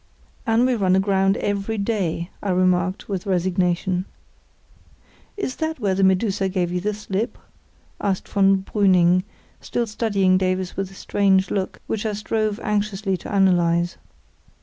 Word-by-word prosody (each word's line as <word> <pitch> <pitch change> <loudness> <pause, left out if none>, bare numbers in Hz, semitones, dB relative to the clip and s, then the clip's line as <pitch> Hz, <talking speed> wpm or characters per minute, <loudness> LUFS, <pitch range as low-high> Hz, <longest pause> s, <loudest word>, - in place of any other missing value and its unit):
("And 225 +2 +3
we 255 - +2
run 190 -5 +2
aground 195 0 +2
every 205 +2 -2
day," 195 -5 -2
I 205 - -3
remarked, 185 +1 +1
with 195 -1 -4
resignation.) 180 0 0 1.3
"Is 265 -11 -3
that 315 -2 -2
where 200 -4 +1
the 195 +1 +1
Medusa 190 +1 +2
gave 180 -2 -1
you 180 0 -1
the 210 +3 0
slip?" 210 +1 -3 0.6
asked 195 -2 -1
von 195 -1 +3
Brüning, 185 -3 +3 0.4
still 240 - -2
studying 200 -4 +1
Davies 185 -1 -1
with 195 -1 -3
a 195 - -15
strange 190 -1 +1
look, 190 -2 -3
which 220 0 -2
I 215 - -2
strove 215 +1 -1
anxiously 205 -2 -1
to - - -9
analyse. 175 -2 +2
195 Hz, 145 wpm, -22 LUFS, 185-210 Hz, 1.3 s, And